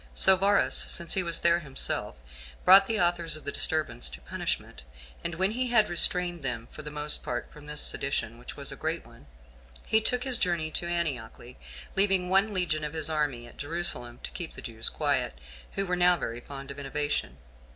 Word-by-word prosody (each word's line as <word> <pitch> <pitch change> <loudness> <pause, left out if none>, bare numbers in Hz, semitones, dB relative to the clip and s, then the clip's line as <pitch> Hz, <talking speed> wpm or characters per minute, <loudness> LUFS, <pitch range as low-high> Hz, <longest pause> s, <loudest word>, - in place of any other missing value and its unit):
So 190 - +6
Varus, 200 +2 +2
since 170 -3 +4
he 190 - +2
was 170 -2 -2
there 170 0 +4
himself, 135 - -3 0.5
brought 195 +1 +9
the 225 -1 -1
authors 175 -3 0
of 155 - -13
the 140 - -2
disturbance 140 - +1
to 65 +1 -10
punishment; - - -4 0.4
and 170 -1 -3
when 190 +4 +1
he 250 +3 -1
had 225 -3 +3
restrained 175 0 +2
them 115 -4 -4
for - - -9
the 150 - -7
most 150 0 0
part 120 -1 -4
from 150 0 -14
this 150 0 +1
sedition, 120 -4 0
which 120 - -10
was 140 -1 +2
a - - -6
great 160 +2 -3
one, 115 -10 -17 0.6
he 220 - +3
took 250 +3 +1
his 255 -3 -1
journey 170 -3 0
to 170 - -4
Antioch, 155 -10 -2 0.6
leaving 190 -2 +3
one 195 +3 +3
legion 175 -5 0
of 150 0 -4
his 160 -1 -1
army 145 -6 -1
at 120 - -15
Jerusalem 145 -6 -1
to - - -5
keep 175 -3 -6
the - - -8
Jews 115 -1 0
quiet, - - -1 0.4
who 195 - -1
were 180 -1 0
now 180 0 +4
very 115 -5 -4
fond 135 +2 -9
of 140 - -9
innovation. 145 - -3
160 Hz, 200 wpm, -28 LUFS, 140-180 Hz, 0.6 s, brought